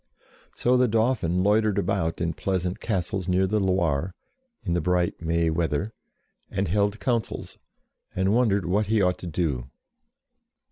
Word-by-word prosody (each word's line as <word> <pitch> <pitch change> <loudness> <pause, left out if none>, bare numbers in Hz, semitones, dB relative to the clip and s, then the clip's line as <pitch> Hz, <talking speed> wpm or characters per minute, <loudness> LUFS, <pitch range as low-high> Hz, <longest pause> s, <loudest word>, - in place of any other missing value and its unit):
So 125 +1 +2
the 125 0 +4
Dauphin 110 -6 +1
loitered 105 0 +2
about 95 -4 -1
in 85 -1 0
pleasant 90 +1 -2
castles 95 -3 -2
near 95 +1 +2
the 105 +3 +1
Loire, 90 -3 0 0.5
in 85 - -1
the 85 - +1
bright 90 +1 0
May 85 0 +1
weather, 85 +5 -1 0.6
and - - -1
held 100 +3 +1
councils, 120 -3 -2 0.6
and 95 +2 +2
wondered 110 -5 +2
what 100 +4 +1
he 110 +1 +2
ought 90 0 +1
to 90 - -7
do. 75 -7 -2
95 Hz, 145 wpm, -25 LUFS, 85-105 Hz, 0.6 s, the